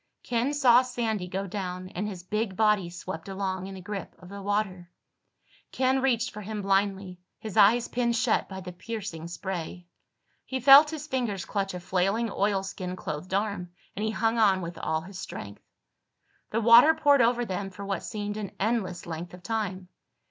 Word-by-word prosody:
Ken 245 +3 0
saw 250 -4 +6
Sandy 230 -7 -2
go 190 +2 -3
down 185 -2 -5
and 200 +3 -3
his 185 -4 -7
big 210 +1 -2
body 210 -5 +3
swept 175 0 -7
along 190 -1 -3
in 195 - -8
the 190 - -9
grip 195 0 -6
of 180 +1 -14
the 200 0 -8
water. 195 -3 -2 0.8
Ken 260 0 +1
reached 245 -3 +1
for 210 - -8
him 210 0 -5
blindly, 195 -2 0 0.2
his 215 -3 -7
eyes 235 +4 +5
pinned 235 -1 0
shut 230 0 +1
by 190 -1 -6
the 180 -1 -7
piercing 195 -5 -6
spray. 175 0 -5 0.6
He 260 - -3
felt 275 +4 +9
his 310 -1 -5
fingers 240 -9 -2
clutch 195 -2 -2
a - - -4
flailing 195 +5 0
oilskin 195 -2 -1
clothed 180 +2 -4
arm, 200 -4 -2 0.2
and 210 - -3
he 220 - +1
hung 225 +1 0
on 195 -4 +4
with 170 0 -6
all 160 0 -1
his 185 +3 -10
strength. 100 - -8 0.9
The 225 - 0
water 235 +8 +8
poured 290 -4 +4
over 240 +1 +2
them 195 -1 -3
for 200 +1 -9
what 195 -1 -2
seemed 205 0 -4
an 205 -3 -5
endless 195 -4 -1
length 170 +2 -6
of 180 - -16
time. 195 -4 -3
200 Hz, 180 wpm, -27 LUFS, 185-230 Hz, 0.9 s, felt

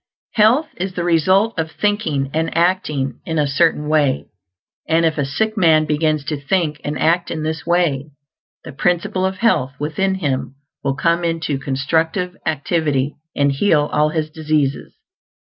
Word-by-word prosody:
Health 240 +8 +4
is 185 +1 -4
the 175 - -2
result 185 +5 +2
of 160 0 -1
thinking 160 -8 -1
and 160 +1 -1
acting 150 -7 0
in 160 - -3
a 150 - +3
Certain 150 +1 +1
Way; 150 -4 +2 0.6
and 165 +1 +3
if 160 -1 0
a 140 - +1
sick 220 +11 -1
man 160 -6 +4
begins 155 -1 0
to 150 -1 -3
think 155 0 -1
and 150 +1 -3
act 170 +2 +1
in 155 -1 -3
this 160 0 -4
Way, 165 -6 +1 0.6
the - - -8
Principle 180 +5 0
of 190 - -4
Health 135 - +1
within 175 +6 -1
him 140 -6 -2 0.3
will 135 -1 0
come 170 +3 +1
into 165 -4 -1
constructive 160 +7 -1
activity 150 -2 0 0.2
and 140 0 +2
heal 150 0 +2
all 150 0 +3
his 155 -1 -2
diseases. 155 -3 -1
160 Hz, 160 wpm, -19 LUFS, 145-175 Hz, 0.6 s, Health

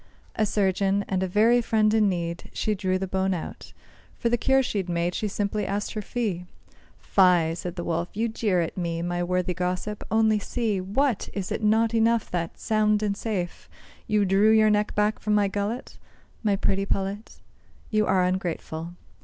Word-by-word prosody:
A 215 - +1
surgeon, 200 0 +1
and 185 -1 -1
a 190 - 0
very 225 +6 +4
friend 215 -2 +2
in 215 -2 +4
need, 170 -2 -4
She 215 - 0
drew 185 -2 0
the 190 - -2
bone 190 0 0
out. 165 - -7 0.5
For 235 - 0
the 240 - +3
cure 265 +3 +3
she'd 200 -7 -2
made 170 +1 0
She 215 - -2
simply 205 +1 -2
asked 205 +1 -2
her 215 - -3
fee. 200 -7 -3 0.5
"Fie!" 180 -4 +3
said 175 +1 -5
the 175 - -4
Wolf, 170 +1 -2
"you 225 +2 0
jeer 210 -5 0
at 165 - -3
me, 170 -2 -2
My 175 0 -2
worthy 180 0 0
gossip. 180 +4 -3
Only 220 -1 +3
see: 215 -3 -1
What! 225 +6 0
is 195 -3 -4
it - - -2
not 220 +2 +3
enough 230 0 +2
that, 170 -2 -3
sound 215 -1 +2
and 205 -1 0
safe, 200 -5 -4 0.4
You 210 -1 +2
drew 195 +3 +4
your 220 -1 +5
neck 210 0 0
back 210 +1 +1
from 210 -1 0
my 205 -1 +3
gullet, 205 +5 -4 0.4
My 210 -3 +2
pretty 195 0 0
pullet? 195 +3 -3 0.5
You 215 -1 +2
are 185 -1 +3
ungrateful. 175 -2 -3
200 Hz, 185 wpm, -25 LUFS, 180-215 Hz, 0.5 s, your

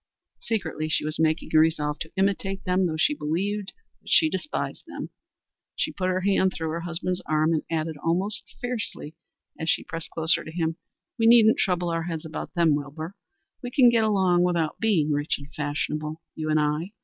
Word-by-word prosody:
Secretly 160 -8 -2
she 155 - +1
was 155 +1 -3
making 160 +1 +1
a 155 - +7
resolve 155 -2 +2
to 160 - -6
imitate 195 0 0
them, 185 0 +2
though 160 -1 -3
she 155 - +3
believed 190 +7 -2 0.3
that - - -12
she 315 - +5
despised 310 - -3
them. - - -7 0.6
She - - -1
put 185 -1 -2
her 185 0 0
hand 190 -1 +2
through 160 -1 -2
her 165 - -2
husband's 175 +2 -3
arm 155 +1 +2
and 155 - +1
added, 160 -1 -2
almost 195 +7 0 0.2
fiercely, 230 -10 -4 0.5
as 160 - -2
she 180 - +2
pressed 165 0 -5
closer 165 +1 +1
to 155 - -8
him, 165 -1 -1 0.4
"We 225 - +4
needn't 225 -1 +7
trouble 180 -2 +1
our 165 -1 -1
heads 165 -2 -4
about 160 +4 -6
them, 170 -3 +4
Wilbur. 150 +4 -4 0.5
We 245 - -4
can 250 0 +6
get 230 -1 +3
along 190 -5 +3
without 170 -3 0
being 180 -9 +2
rich 145 +1 +1
and 145 +1 -13
fashionable, 150 +1 -3
you 155 -1 -4
and 155 0 +3
I. 150 +6 -1
165 Hz, 190 wpm, -26 LUFS, 155-190 Hz, 0.6 s, a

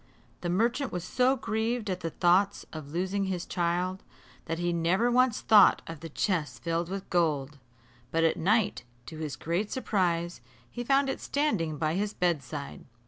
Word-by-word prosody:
The 175 - -2
merchant 235 +8 +1
was 180 -1 -3
so 255 +7 +2
grieved 225 -1 -2
at 185 -2 -2
the 165 - -3
thoughts 185 +5 +2
of 155 -3 -8
losing 190 +4 -1
his 185 -2 -3
child, 180 +2 -1 0.4
that 165 0 -3
he 175 0 0
never 180 +8 +2
once 250 -1 +3
thought 210 -2 +6
of 165 -2 -8
the 165 +1 -8
chest 150 - -2
filled 170 0 -1
with 195 0 -5
gold; 150 -5 0 0.5
but 165 0 +1
at 165 - +3
night, 195 - +1 0.2
to 155 - -9
his 150 -4 -4
great 175 +8 -2
surprise, 175 - -1 0.3
he 240 - -4
found 275 +2 +3
it 270 - -2
standing 200 - -1
by 155 +1 0
his 205 +3 -2
bedside. 150 -5 -2
180 Hz, 170 wpm, -29 LUFS, 165-210 Hz, 0.5 s, thought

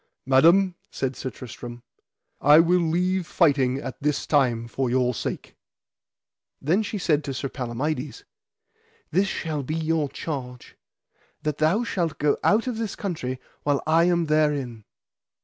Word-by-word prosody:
Madam, 170 +8 +5 0.2
said 130 -1 -3
Sir 130 - -4
Tristram, 120 -1 -9 0.6
I 145 +2 +7
will 175 +2 +4
leave 180 +2 0
fighting 135 -7 +2
at 130 -2 -7
this 150 0 0
time 120 -6 +2
for 130 +2 -2
your 125 0 +2
sake. - - -5 1.0
Then 170 +9 +2
she 210 0 -4
said 155 -5 +1
to 140 -2 -4
Sir 135 +1 -3
Palamides: 130 - -4 0.9
This 195 +2 +2
shall 155 -5 -3
be 150 +4 -4
your 160 -2 0
charge, 130 -4 -6 0.7
that 150 -1 -2
thou 165 +9 +3
shalt 175 -9 -2
go 150 -1 +2
out 220 +3 +3
of 250 -3 -3
this 220 -3 -3
country 130 -10 -4 0.2
while 145 -1 +1
I 165 +2 +4
am 175 -1 +2
therein. 145 -8 0
150 Hz, 145 wpm, -25 LUFS, 130-170 Hz, 1.0 s, I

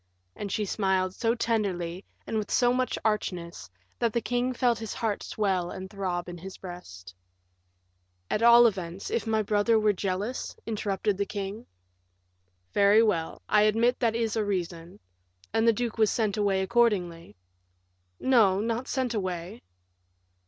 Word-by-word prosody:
And 200 -2 -5
she 210 - -1
smiled 190 -2 0
so 230 +3 0
tenderly, 195 -6 -1 0.2
and 220 - -1
with 210 - -5
so 245 -1 +3
much 255 0 0
archness, 175 - -2 0.3
that 230 -2 +1
the 235 - +2
king 245 +2 -1
felt 245 -2 +1
his 225 -1 -5
heart 220 -4 -1
swell 190 -4 -1
and 190 0 -7
throb 185 -3 -3
in 175 -1 -8
his 190 +2 -9
breast. 95 - -10 1.1
"At 210 - -1
all 235 +1 +8
events, 190 -4 -2
if 225 -1 -1
my 220 -1 +1
brother 210 +2 +2
were 215 -1 +3
jealous?" 200 +6 -3
interrupted 205 -2 -1
the 200 - 0
king. 200 +2 -5 1.1
"Very 205 +2 +5
well, 170 -7 -1
I 210 - +4
admit 225 +4 +3
that 230 -3 +1
is 225 -2 -1
a 220 - +1
reason; 175 -3 -4 0.5
and 225 +1 +2
the - - +8
duke 230 0 -3
was 215 -2 +5
sent 215 -4 0
away 200 -3 +1
accordingly." 190 - +1 0.8
"No, 220 -7 +4
not 230 +4 -2
sent 255 -2 -1
away." 185 +1 -4
210 Hz, 150 wpm, -27 LUFS, 185-230 Hz, 1.1 s, all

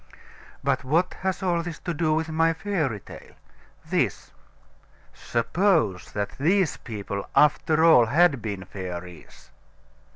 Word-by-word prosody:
But - - 0
what 165 +7 +1
has 190 0 -2
all 175 -2 +1
this 170 -1 -6
to 175 - -3
do 160 0 0
with 160 0 -1
my 165 +1 +2
fairy 160 - -2
tale? - - -13 0.5
This: - - -1 0.8
Suppose 120 - 0
that 105 +5 -4
these 180 +4 +2
people, 100 -3 -6
after 155 +2 +4
all, 125 -9 +6
had 145 0 +3
been 100 -4 -5
fairies? 90 -3 -9
155 Hz, 125 wpm, -25 LUFS, 105-170 Hz, 0.8 s, all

